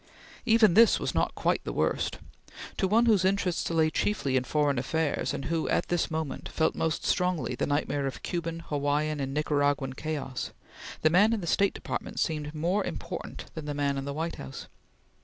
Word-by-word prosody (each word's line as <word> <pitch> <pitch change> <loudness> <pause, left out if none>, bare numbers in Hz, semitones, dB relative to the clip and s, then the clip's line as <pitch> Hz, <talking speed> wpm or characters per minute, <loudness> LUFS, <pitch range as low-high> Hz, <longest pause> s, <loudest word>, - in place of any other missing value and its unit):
Even 220 -5 +6
this 230 +3 +6
was - - -2
not - - 0
quite - - 0
the - - -4
worst. - - 0 0.6
To 190 - +2
one 225 +5 +4
whose 210 -5 +4
interests 190 -2 +1
lay 160 -1 +2
chiefly 140 -11 0
in 130 0 +2
foreign 145 -2 +1
affairs, 160 +4 -1
and 140 -1 -4
who, 160 +2 -1
at - - +1
this 175 -1 +1
moment, 160 -3 -4
felt 160 - +1
most 160 -1 -1
strongly 180 -9 +1
the 120 - -1
nightmare 145 -1 0
of 125 -3 -6
Cuban, 165 -2 -3
Hawaiian, 150 0 -1
and 135 -1 -2
Nicaraguan 145 -2 +1
chaos, 140 -3 -4 0.5
the 155 - +5
man 205 +6 +5
in 220 - -1
the - - -4
State 195 +4 +2
Department - - -4
seemed 150 -2 -1
more 175 +7 +1
important - - -6
than 160 -2 -6
the 145 -1 -3
man 140 -1 0
in 135 0 -3
the 140 - -3
White 165 +3 -3
House. 65 - -8
155 Hz, 190 wpm, -28 LUFS, 145-175 Hz, 0.6 s, Even